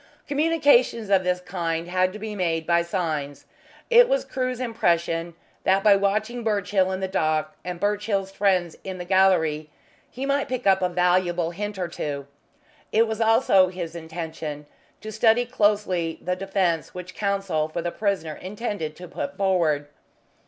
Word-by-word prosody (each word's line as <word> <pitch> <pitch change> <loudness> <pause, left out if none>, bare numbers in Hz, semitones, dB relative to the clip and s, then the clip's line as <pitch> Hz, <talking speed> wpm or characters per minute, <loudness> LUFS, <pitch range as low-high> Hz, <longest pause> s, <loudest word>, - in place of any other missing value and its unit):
Communications 285 -8 +3
of 190 -1 +4
the 180 0 +2
kind 170 -2 -2
had 185 +1 +1
to 210 - -8
be 215 0 -6
made 165 -5 -1
by 170 0 +3
signs. 160 -5 -3 0.5
It 485 +1 +7
was - - +1
Crewe's 255 -1 -3
impression 170 -8 0 0.3
that 190 +1 +3
by 205 -2 +7
watching 215 +4 0
Birchill 200 -3 +1
in 190 0 -3
the 190 - -1
dock 155 -4 0
and 180 0 -5
Birchill's 205 -1 -1
friends 185 -4 +1
in 190 -1 -5
the 175 - -6
gallery 175 -5 +2 0.4
he 260 +2 -5
might 280 0 0
pick 255 -1 -3
up 190 -1 +4
a 180 - +1
valuable 180 -1 +1
hint 205 +3 -5
or 180 -2 -2
two. 145 -4 -5 0.7
It 225 +2 +4
was 220 0 -3
also 225 -4 +5
his 175 -2 -6
intention 160 -2 -6 0.4
to 215 - -7
study 225 +2 +3
closely 205 -8 +1
the 180 0 -2
defence 185 -4 -1
which 180 +1 -7
Counsel 195 -6 -1
for 170 +1 -4
the 175 - -2
prisoner 195 -7 -1
intended 195 -4 -5
to 180 +2 -10
put 280 - -5
forward. 170 -7 +1
185 Hz, 160 wpm, -24 LUFS, 170-210 Hz, 0.7 s, It